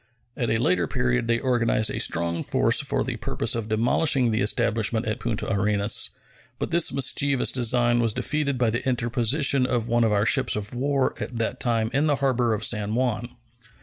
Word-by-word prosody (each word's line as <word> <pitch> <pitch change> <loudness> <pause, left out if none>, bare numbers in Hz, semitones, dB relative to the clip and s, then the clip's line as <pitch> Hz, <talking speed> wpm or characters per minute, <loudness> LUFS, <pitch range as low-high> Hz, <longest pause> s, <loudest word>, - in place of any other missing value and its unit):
At 120 - -2
a - - +1
later 90 -7 +1
period 60 - -1
they 115 0 +2
organized 115 -4 +1
a - - -4
strong 85 0 -1
force - - +2
for - - -2
the - - -4
purpose - - -2
of 115 -2 -4
demolishing 120 +3 +2
the 110 - 0
establishment 110 +1 0
at 110 - -3
Punta 115 -3 -3
Arenas, 100 +1 +1 0.5
but - - -4
this 170 0 +2
mischievous 135 0 +1
design 120 -1 +2
was 115 -2 +1
defeated 140 +3 0
by 120 -2 +1
the 120 +3 -3
interposition 125 +3 +1
of 120 -3 -1
one 120 0 +2
of 110 - +2
our 105 0 +1
ships 130 +1 +2
of 105 +1 -5
war 135 +1 0
at 120 - -5
that 115 -1 -2
time 115 -2 0
in 145 +3 +1
the 145 - +2
harbor 125 -4 0
of 110 0 -2
San 105 -1 0
Juan. 120 -1 -2
120 Hz, 190 wpm, -24 LUFS, 110-130 Hz, 0.5 s, they